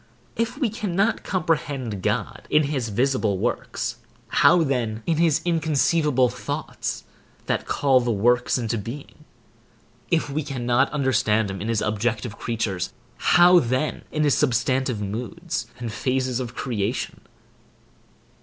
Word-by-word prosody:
If 230 +2 -1
we 255 -7 0
cannot 205 0 0
comprehend 145 - -1
God - - -2
in 150 - +4
his 135 -5 -2
visible 115 -3 +1
works, - - -2 0.3
how 175 - +5
then 115 -6 -1
in 165 -2 +1
his 160 -1 +3
inconceivable 155 -4 +2
thoughts, - - -4 0.4
that - - -1
call 135 -2 +3
the 120 -1 0
works 120 +5 +2
into 115 -2 -1
being? 120 +8 -9 0.8
If 165 -3 +1
we 145 +2 -2
cannot 130 -2 0
understand 110 -7 +1
him 95 - -6
in 105 - -3
his 115 -2 0
objective 110 +1 -2
creatures, 110 -6 -2 0.3
how 175 +1 +6
then 130 +4 -1
in 155 - 0
his 145 -2 +3
substantive 130 -3 +1
moods 120 - -4
and 120 -3 -5
phases 130 +2 -1
of 120 -2 -5
creation? 115 -2 -3
130 Hz, 130 wpm, -24 LUFS, 115-155 Hz, 0.8 s, how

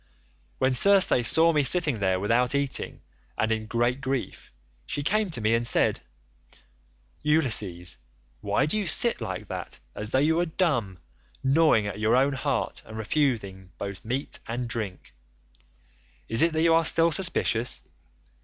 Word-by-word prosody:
"When 130 0 +1
Circe 195 +9 +5 0.2
saw 165 +1 +5
me 150 - +2
sitting 145 -3 +2
there 95 -2 0
without 120 +6 +1
eating, 140 -1 -2 0.3
and 110 - 0
in 110 -1 -2
great 120 +3 -1
grief, 135 -1 -5 0.4
she 145 - -3
came 210 +5 0
to 125 -9 -5
me 110 +1 +1
and 115 +1 +1
said, - - +1 1.2
'Ulysses, 110 - 0 0.4
why 105 0 0
do 185 +8 0
you 200 - -3
sit 235 +8 +4
like 95 +2 -5
that - - -7
as 105 +1 -5
though 130 - 0
you 155 +4 +2
were 175 0 0
dumb, 130 - -1 0.5
gnawing 135 -5 +3
at 105 0 -6
your 110 +2 +2
own 135 +2 +2
heart, 135 0 -3
and 110 - -11
refusing 105 - -2
both 100 -1 -7
meat 130 +5 -4
and 120 +1 -4
drink? 110 -6 -6 1.1
Is 115 - 0
it 165 0 +2
that 160 0 0
you 165 -1 +4
are 165 0 +3
still 165 +1 +3
suspicious? 135 -8 +1
125 Hz, 155 wpm, -25 LUFS, 110-155 Hz, 1.2 s, Circe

